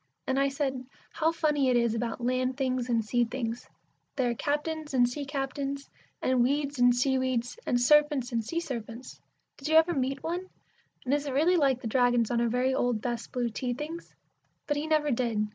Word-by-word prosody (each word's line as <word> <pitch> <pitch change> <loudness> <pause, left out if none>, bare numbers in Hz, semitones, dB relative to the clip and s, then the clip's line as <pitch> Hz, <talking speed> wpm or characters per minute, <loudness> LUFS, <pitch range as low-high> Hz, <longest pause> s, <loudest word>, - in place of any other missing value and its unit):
And 265 +1 0
I 275 0 +3
said, 270 -2 -2 0.3
"How 325 0 +1
funny 300 -5 +1
it 250 - +4
is 235 -2 +2
about 230 +1 -3
land 255 +1 0
things 255 -2 -1
and 230 -2 +1
sea 240 +3 +2
things! 235 -1 -4 0.5
There 250 -3 +1
are - - 0
captains 295 +3 -2
and 245 -1 +5
sea 280 +4 -5
captains, 275 0 -4 0.3
and 255 -1 +3
weeds 280 +2 0
and 245 0 +5
sea 265 +1 +2
weeds, 255 - -2
and 245 - +2
serpents 290 -1 +3
and 230 -1 0
sea 335 +10 -2
serpents. 240 -4 -7 0.4
Did 275 - -6
you 315 - +2
ever 325 +2 +6
meet 270 -1 -2
one, 355 +3 -3 0.6
and 260 - +1
is 290 0 0
it 275 - -3
really 320 +7 +3
like 270 -6 +2
the - - -4
dragons 245 -1 +2
on 235 -1 +1
our 235 - +2
very 250 +3 +1
old 245 -3 +1
best 235 0 -4
blue 245 -2 -1
tea 245 +2 -3
things?" 315 +5 -7 0.5
But 295 - -1
he 300 +2 -2
never 305 -2 +2
did. 230 -4 0
260 Hz, 205 wpm, -28 LUFS, 245-290 Hz, 0.6 s, ever